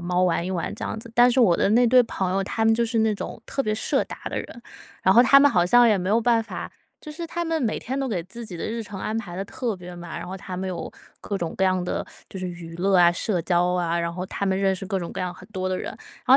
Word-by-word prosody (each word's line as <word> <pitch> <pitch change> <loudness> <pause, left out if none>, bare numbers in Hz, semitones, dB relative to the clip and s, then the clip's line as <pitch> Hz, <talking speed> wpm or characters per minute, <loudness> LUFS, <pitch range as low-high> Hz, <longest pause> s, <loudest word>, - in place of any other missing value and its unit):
猫 180 +1 0
玩 175 -1 +1
一 185 - -3
玩 180 0 -2
这 - - -6
样 220 - -4
子。 230 +1 -10
但 245 +1 +6
是 255 - +1
我 195 -8 +5
的 - - +2
那 240 +3 +5
对 250 +2 +6
朋 190 -4 -2
友， 195 - +1
他 220 +3 -1
们 225 - +5
就 235 +1 +1
是 225 0 0
那 220 -1 +2
种 - - -6
特 275 - -1
别 215 -2 0
社 215 - +1
达 - - -8
的 - - -4
人， 235 - -8 0.4
然 190 - +4
后 240 - +8
他 275 +2 +7
们 285 +1 +6
好 175 -6 +3
像 240 +5 +6
也 210 - +4
没 180 0 -2
有 225 - +4
办 230 -1 +3
法 225 - -7 0.3
就 305 - -8
是 335 +2 -5
他 345 +1 -3
们 325 -3 -1
每 220 - 0
天 265 +3 -4
都 270 -1 -1
给 190 -7 -2
自 230 +6 -9
己 180 - -7
的 - - -5
日 230 +1 -3
程 205 -3 -8
安 215 +3 -3
排 200 -6 -5
得 195 - -3
特 230 0 -3
别 180 -1 -10
满， 175 -1 -7
然 - - -7
后 185 - -6
他 185 -1 -7
们 190 - -3
有 175 -2 -5 0.3
各 200 - -3
种 170 -4 -4
各 - - -1
样 185 -1 +2
的 180 - -2 0.3
就 190 - -7
是 185 - -3
娱 170 -1 -9
乐 190 +2 +2
啊、 175 -1 +6
社 180 +1 -1
交 175 0 +2
啊。 170 -1 0
然 170 0 -1
后 180 +1 -4
他 200 - -3
们 190 0 +1
认 195 -1 +2
识 195 +1 -6
各 190 +1 -1
种 170 -2 -6
各 - - -5
样 180 -1 -2
很 - - -14
多 185 -2 -2
的 185 - -1
人， - - -5 0.4
然 - - -31
195 Hz, 330 characters per minute, -24 LUFS, 180-230 Hz, 0.4 s, 后